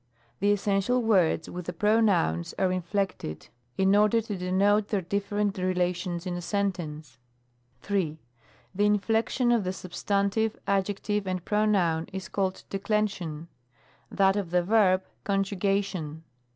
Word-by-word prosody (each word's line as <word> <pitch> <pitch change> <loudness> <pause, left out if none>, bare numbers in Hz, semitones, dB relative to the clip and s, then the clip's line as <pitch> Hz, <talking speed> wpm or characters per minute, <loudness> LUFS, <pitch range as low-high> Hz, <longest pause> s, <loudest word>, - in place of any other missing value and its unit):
The 205 +2 +3
essential 205 +4 +1
words, 185 -7 +2
with 180 -1 -7
the 180 - -3
pronouns, 200 - +2
are 185 -1 +2
in 185 0 -1
flected, 180 - -3 0.3
in 195 +1 +4
order 210 +2 +4
to 220 -2 -4
denote 195 +3 +2
their 200 -4 -1
different 200 +2 -1
relations 180 -1 -1
in 180 - -2
a 175 - -4
sentence. 165 - -3 0.6
3. 185 -7 -1 0.6
The 205 +2 +2
inflection 225 +4 +1
of 235 -3 +3
the 185 - -1
substantive, 200 +4 -1
adjective, 200 +1 -1
and 185 -2 -3
pronoun, 195 -6 +1
is 190 0 -6
called 190 -2 -2
Declension; 195 -6 -2 0.6
that 195 0 +3
of 200 -4 -2
the 180 0 +2
verb, 190 -2 +3 0.2
Conju 195 -1 -1
gation. 190 -6 -1
195 Hz, 135 wpm, -27 LUFS, 180-205 Hz, 0.6 s, in